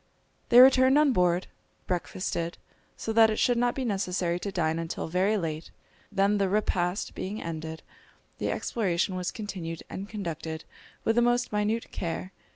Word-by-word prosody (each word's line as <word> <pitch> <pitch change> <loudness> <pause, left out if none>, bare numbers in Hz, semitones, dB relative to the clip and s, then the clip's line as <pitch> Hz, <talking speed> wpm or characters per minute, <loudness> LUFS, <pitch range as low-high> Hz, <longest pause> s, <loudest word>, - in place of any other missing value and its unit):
They 240 0 +8
returned 260 +1 +7
on 300 -3 +4
board, 180 -2 +2 0.4
breakfasted, 175 -1 -3 0.4
so 225 - -3
that 225 0 +6
it 215 - 0
should 245 -1 +2
not 245 0 +1
be 265 - -2
necessary 180 -4 -1
to 200 - -4
dine 165 -3 0
until 165 -1 -4
very 190 +6 +2
late; 160 -3 -4 0.4
then 200 +1 +2
the 195 -1 +2
repast 185 -2 0
being 205 +4 -4
ended, 160 -1 -6 0.6
the - - -1
exploration 185 -4 -1
was 180 -1 -2
continued 180 -6 -6
and 195 +2 -6
conducted 165 -6 -5 0.4
with 225 +1 +1
the - - +6
most 240 -1 +1
minute 210 +2 0
care. 175 +2 -4
190 Hz, 160 wpm, -28 LUFS, 170-220 Hz, 0.6 s, They